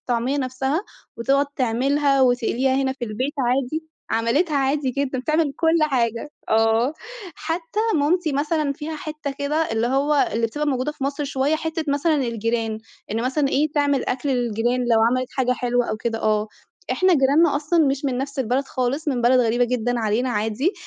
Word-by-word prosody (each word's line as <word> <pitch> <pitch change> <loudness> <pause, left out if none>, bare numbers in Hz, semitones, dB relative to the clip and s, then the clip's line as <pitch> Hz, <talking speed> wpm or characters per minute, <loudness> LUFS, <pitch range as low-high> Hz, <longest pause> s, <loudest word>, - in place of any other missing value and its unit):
الطعمية 245 +3 -1
نفْسها، 265 +6 -1 0.3
وتقعد 275 +4 +2
تعملها 275 +3 +2
وتقليها 250 +1 +2
هنا 265 0 +1
في 265 -2 -5
البيت 245 +6 -3
عادي. 270 +5 0 0.3
عملتها 280 +8 +1
عادي 275 0 +1
جدًا 270 0 -2
بتعمل 305 +3 +1
كُل 330 0 +3
حاجة. 245 -2 0 0.2
آه، 225 +4 +3 0.4
حتّى 330 +6 -3
مامتي 315 +2 +1
مثلًا 295 +1 0
فيها 300 +3 -6
حتّة 305 -1 -5
كده 285 +1 -1 0.2
اللي 225 +1 +1
هو 280 +3 +2
اللي 230 +2 +1
بتبقى 295 +6 -3
موجودة 270 +1 -1
في 280 - -6
مصر 280 +1 -2
شويّة 275 +2 0
حتّة 320 0 -3
مثلًا 285 +3 +2
الجيران، 230 -4 -1 0.3
إن 225 +2 -1
مثلًا 275 +3 +1
إيه 295 +2 +1
تعمل 285 -3 +1
أكل 255 +3 -2
للجيران 240 -1 0
لو 235 -2 +3
عملت 255 0 -1
حاجة 255 -2 +2
حلوة 245 -1 0
أو - - -2
كده 225 0 -3
آه، 215 0 +1 0.5
إحنا 370 -1 +3
جيرانّا 285 +2 +4
أصلًا 310 +2 +2
مش 275 +1 -1
من 255 -3 0
نفْس 275 +1 -5
البلد 260 +2 0
خالص 270 +4 -2
من 250 -4 -1
بلد 250 +2 +5
غريبة 240 +1 +2
جدًا 245 0 -1
علينا 225 +3 0
عادي، 225 - 0
265 Hz, 175 wpm, -22 LUFS, 240-295 Hz, 0.5 s, بلد